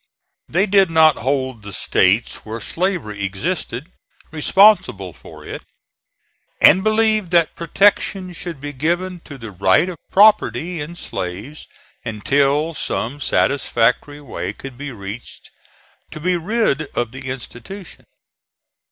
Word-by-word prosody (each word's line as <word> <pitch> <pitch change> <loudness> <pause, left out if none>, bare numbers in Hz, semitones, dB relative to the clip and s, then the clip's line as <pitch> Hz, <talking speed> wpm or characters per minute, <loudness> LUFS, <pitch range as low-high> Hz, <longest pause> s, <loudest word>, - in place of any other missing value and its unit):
They 185 +5 +2
did 195 -2 +4
not 160 -2 +5
hold 130 -2 -2
the 105 0 -9
States 95 +4 +1
where 110 +1 -7
slavery 145 - -2
existed 125 - -3 0.4
responsible 195 +7 +3
for - - -14
it; - - -7 1.0
and 190 - +7
believed 215 -3 +2
that 170 -2 +3
protection 185 +1 +1
should 170 -4 -6
be 145 +1 -6
given 175 +6 -1
to 145 - -9
the 115 -4 -8
right 95 - +3
of 170 -4 -8
property 180 - +3
in 160 +4 -7
slaves 105 - -6 0.4
until 140 +8 +1
some 140 -2 -3
satisfactory 140 0 +1
way 105 -8 -5
could 135 +3 -10
be 145 +3 -6
reached 100 +1 -9 0.6
to - - -9
be 180 +3 +1
rid 175 -4 0
of 120 -2 0
the 130 +1 -9
institution. 130 - -8
145 Hz, 125 wpm, -20 LUFS, 120-180 Hz, 1.0 s, and